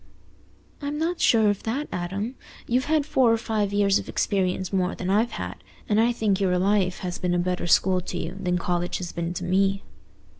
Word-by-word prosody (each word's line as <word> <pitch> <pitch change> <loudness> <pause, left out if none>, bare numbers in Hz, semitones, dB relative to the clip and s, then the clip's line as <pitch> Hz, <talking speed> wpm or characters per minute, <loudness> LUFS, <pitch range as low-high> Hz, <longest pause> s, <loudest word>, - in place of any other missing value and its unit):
"I'm 290 +1 -3
not 335 +3 -1
so - - +5
sure 220 -2 +5
of 205 - -5
that, 270 +7 -2
Adam. 195 +7 -3 0.3
You've 250 +2 +1
had 305 -1 +1
four 260 -5 +3
or 230 - +3
five 215 -3 -1
years 205 -1 +3
of - - -8
experience 190 -1 -1
more 185 -1 +1
than 185 0 -3
I've 220 +4 +2
had, 90 0 -5 0.3
and 215 +1 +3
I 235 +1 +3
think 210 -4 0
your 180 -2 +2
life 190 -1 +1
has 180 -1 -4
been 180 -1 0
a - - +2
better 180 0 -1
school 185 +2 +3
to - - -5
you 170 +2 -4
than 180 -2 0
college 175 0 -1
has 175 -2 -5
been 170 0 -3
to 180 - -4
me." 195 +2 +1
195 Hz, 215 wpm, -25 LUFS, 180-225 Hz, 0.3 s, so